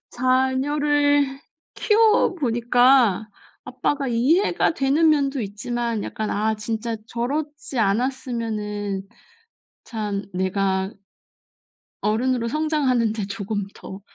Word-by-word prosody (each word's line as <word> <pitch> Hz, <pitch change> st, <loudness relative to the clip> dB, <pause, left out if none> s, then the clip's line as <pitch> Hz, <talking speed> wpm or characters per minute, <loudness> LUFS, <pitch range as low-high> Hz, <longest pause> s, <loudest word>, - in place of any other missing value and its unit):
자녀를 280 Hz, +2 st, +1 dB, 0.3 s
키워 435 Hz, -2 st, +3 dB
보니까 240 Hz, -, +3 dB, 0.4 s
아빠가 260 Hz, +2 st, -2 dB
이해가 300 Hz, -, +2 dB
되는 290 Hz, +4 st, +3 dB
면도 280 Hz, -2 st, +1 dB
있지만 230 Hz, +2 st, -3 dB
약간 215 Hz, -1 st, -4 dB
'아 220 Hz, +1 st, 0 dB
진짜 220 Hz, +1 st, -3 dB
저렇지 285 Hz, +3 st, -4 dB
않았으면은 210 Hz, -3 st, -2 dB, 0.8 s
참 210 Hz, -3 st, -4 dB
내가' 190 Hz, +1 st, 0 dB, 1.1 s
'어른으로 235 Hz, +3 st, 0 dB
성장하는 275 Hz, -6 st, +1 dB
데 215 Hz, -2 st, -3 dB
조금 205 Hz, 0 st, -4 dB
더 190 Hz, +1 st, -10 dB
240 Hz, 210 characters per minute, -23 LUFS, 210-275 Hz, 1.1 s, 키워